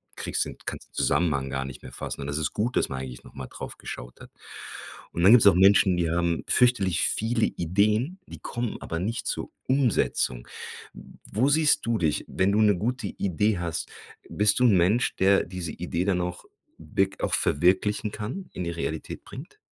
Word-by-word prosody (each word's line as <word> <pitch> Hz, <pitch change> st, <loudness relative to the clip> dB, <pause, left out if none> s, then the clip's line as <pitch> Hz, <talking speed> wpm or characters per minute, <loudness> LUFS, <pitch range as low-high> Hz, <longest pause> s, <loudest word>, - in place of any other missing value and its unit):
kriegst -, -, -1 dB
den -, -, -8 dB
kannst -, -, -6 dB
den -, -, -45 dB
Zusammenhang 70 Hz, -6 st, +1 dB
gar 65 Hz, 0 st, -2 dB
nicht 65 Hz, -2 st, -9 dB
mehr 65 Hz, -, -9 dB
fassen. -, -, -6 dB
Und 70 Hz, -, -5 dB
das 75 Hz, +1 st, -2 dB
ist 75 Hz, -, -1 dB
gut, 120 Hz, +4 st, -2 dB
dass -, -, +1 dB
man 65 Hz, -, -4 dB
eigentlich 65 Hz, -2 st, -8 dB
noch -, -, -16 dB
mal 65 Hz, -, -6 dB
drauf -, -, -9 dB
geschaut 60 Hz, 0 st, -8 dB
hat. -, -, -13 dB, 0.8 s
Und 85 Hz, -, -3 dB
dann 95 Hz, +4 st, +7 dB
gibt's 120 Hz, -3 st, +7 dB
auch 100 Hz, -, +8 dB
Menschen, 95 Hz, 0 st, +5 dB
die 85 Hz, -1 st, 0 dB
haben 85 Hz, 0 st, 0 dB
fürchterlich 115 Hz, -9 st, +3 dB
viele 115 Hz, +1 st, +1 dB
Ideen, 105 Hz, -, 0 dB
die -, -, -11 dB
kommen 120 Hz, -1 st, -4 dB
aber 80 Hz, -, -4 dB
nicht 110 Hz, +6 st, -3 dB
zur -, -, -3 dB, 0.2 s
Umsetzung. 120 Hz, -, +1 dB, 0.8 s
Wo 125 Hz, +7 st, +2 dB
siehst 155 Hz, 0 st, +3 dB
du 115 Hz, -1 st, 0 dB
dich, 80 Hz, -4 st, 0 dB
wenn 95 Hz, +1 st, +1 dB
du 105 Hz, +2 st, +3 dB
'ne 105 Hz, -2 st, +5 dB
gute 120 Hz, +6 st, -2 dB
Idee 100 Hz, +2 st, 0 dB
hast? 85 Hz, -1 st, -3 dB, 0.4 s
Bist 105 Hz, +2 st, +2 dB
du -, -, +3 dB
'n 110 Hz, -5 st, +5 dB
Mensch, 95 Hz, +8 st, +2 dB
der 95 Hz, +1 st, +4 dB
diese 90 Hz, -2 st, -5 dB
Idee 85 Hz, +2 st, -3 dB
dann 95 Hz, -3 st, +1 dB
auch 90 Hz, 0 st, -5 dB, 0.3 s
wirk 95 Hz, +5 st, -1 dB
auch -, -, 0 dB
verwirklichen 95 Hz, +7 st, +2 dB
kann, 125 Hz, -, -6 dB
in 90 Hz, -, -4 dB
die 85 Hz, -, -2 dB
Realität 80 Hz, -1 st, -5 dB
bringt? -, -, -11 dB
95 Hz, 195 wpm, -26 LUFS, 85-110 Hz, 0.8 s, auch